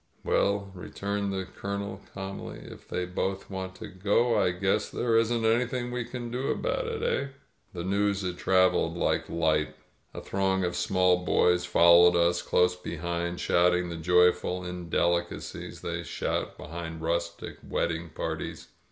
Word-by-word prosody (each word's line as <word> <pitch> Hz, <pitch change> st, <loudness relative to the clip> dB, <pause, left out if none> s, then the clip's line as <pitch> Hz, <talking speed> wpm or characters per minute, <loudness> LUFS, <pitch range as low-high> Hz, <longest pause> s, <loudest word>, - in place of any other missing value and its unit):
"Well," 100 Hz, -1 st, +1 dB
returned 100 Hz, +2 st, -3 dB
the 95 Hz, -1 st, -3 dB
Colonel 100 Hz, 0 st, -5 dB
cahnly, 95 Hz, 0 st, -7 dB
"if -, -, -16 dB
they 90 Hz, -, -2 dB
both 95 Hz, +2 st, -3 dB
want 95 Hz, -1 st, -5 dB
to -, -, -8 dB
go, 105 Hz, +6 st, +1 dB
I 105 Hz, -, +3 dB
guess 95 Hz, +4 st, 0 dB
there 115 Hz, -2 st, 0 dB
isn't 115 Hz, 0 st, +2 dB
anything 120 Hz, +2 st, +1 dB
we 125 Hz, -1 st, -2 dB
can 120 Hz, -1 st, -6 dB
do 125 Hz, +3 st, -2 dB
about -, -, -1 dB
it, -, -, -3 dB
eh?" 140 Hz, -, 0 dB, 0.5 s
The 85 Hz, -2 st, -4 dB
news 100 Hz, +1 st, +1 dB
had 90 Hz, -1 st, -3 dB
traveled 90 Hz, -3 st, +3 dB
like 80 Hz, -1 st, 0 dB
light. 80 Hz, -2 st, +1 dB, 0.4 s
A -, -, -4 dB
throng 95 Hz, -1 st, 0 dB
of 90 Hz, -1 st, -1 dB
small 90 Hz, -1 st, +2 dB
boys 90 Hz, +1 st, +3 dB
followed 85 Hz, 0 st, +6 dB
us 85 Hz, 0 st, +3 dB
close 90 Hz, 0 st, +2 dB
behind, 85 Hz, 0 st, -4 dB
shouting 90 Hz, 0 st, +2 dB
the 85 Hz, -, -5 dB
joyful 90 Hz, +2 st, +2 dB
in 90 Hz, -1 st, -6 dB
delicacies 85 Hz, +1 st, -1 dB
they -, -, -3 dB
shout -, -, -3 dB
behind 80 Hz, 0 st, -7 dB
rustic 85 Hz, +1 st, -3 dB
wedding 85 Hz, 0 st, -2 dB
parties. -, -, -5 dB
90 Hz, 150 wpm, -28 LUFS, 85-100 Hz, 0.5 s, followed